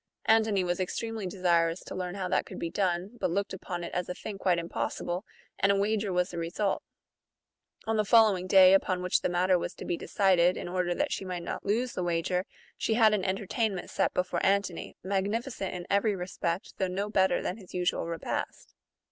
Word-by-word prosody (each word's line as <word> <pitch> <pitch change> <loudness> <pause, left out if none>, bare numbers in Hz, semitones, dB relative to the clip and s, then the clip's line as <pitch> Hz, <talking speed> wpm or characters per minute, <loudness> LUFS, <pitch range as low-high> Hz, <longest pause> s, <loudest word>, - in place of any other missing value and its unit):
Antony 220 -3 +3
was 175 0 -1
extremely 220 +2 -3
desirous 175 -2 +1
to - - -8
learn 180 0 -4
how 190 -2 -2
that - - 0
could - - -8
be 165 - -3
done, 190 +3 -1
but - - 0
looked 200 +3 -1
upon 175 -2 -5
it 170 - -6
as 180 0 -2
a 180 - -3
thing 205 -2 -7
quite 180 -3 +2
impossible; 175 +2 -3 0.4
and 195 - +4
a - - +3
wager 205 0 0
was 180 0 +1
the 170 - -4
result. 180 +4 -1 1.0
On 225 0 0
the 215 - +3
follow 220 -1 +6
ing 185 0 -5
day, 185 -1 +8
upon 185 -1 +2
which 180 - +2
the - - 0
matter 180 +1 +3
was - - -4
to - - -8
be 175 - -1
decided, 185 -2 +3
in - - -5
order 175 0 -1
that - - 0
she - - -2
might 180 -2 -4
not 175 - -5
lose 235 +5 0
the - - -3
wager, 175 +2 0 0.3
she 220 - +1
had 220 -2 +5
an 205 -3 +1
entertainment 195 +1 -1
set - - +1
before 180 0 -1
Antony, 195 -3 0
magnificent 200 +3 -2
in 175 -1 -6
every 200 +1 +2
respect, 180 -1 -3
though 190 - +1
no 195 +3 -2
better 190 -3 +2
than 185 - -2
his 190 -5 -12
usual 180 -1 0
repast. 165 -1 -4
185 Hz, 205 wpm, -29 LUFS, 180-200 Hz, 1.0 s, day